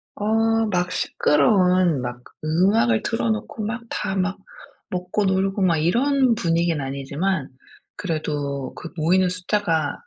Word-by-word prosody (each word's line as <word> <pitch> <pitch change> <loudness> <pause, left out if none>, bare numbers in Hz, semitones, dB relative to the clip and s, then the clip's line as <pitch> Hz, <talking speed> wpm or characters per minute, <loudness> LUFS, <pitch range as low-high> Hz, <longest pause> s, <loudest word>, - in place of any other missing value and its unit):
어 225 +1 +1
막 180 0 0
시끄러운 180 - +2
막 125 0 -5 0.2
음악을 160 - +2
틀어 115 -1 -1
놓고 110 - -4
막 235 +3 -3
다 190 - -3
막 190 +1 -1 0.5
먹고 180 +3 -1
놀고 195 +1 0
막 170 -3 +3
이런 250 - +2
분위기는 170 -5 +1
아니지만 140 +4 -2 0.5
그래도 145 -6 -3
그 - - -8
모이는 180 +4 +3
숫자가 180 -4 0
180 Hz, 250 characters per minute, -22 LUFS, 150-200 Hz, 0.5 s, 막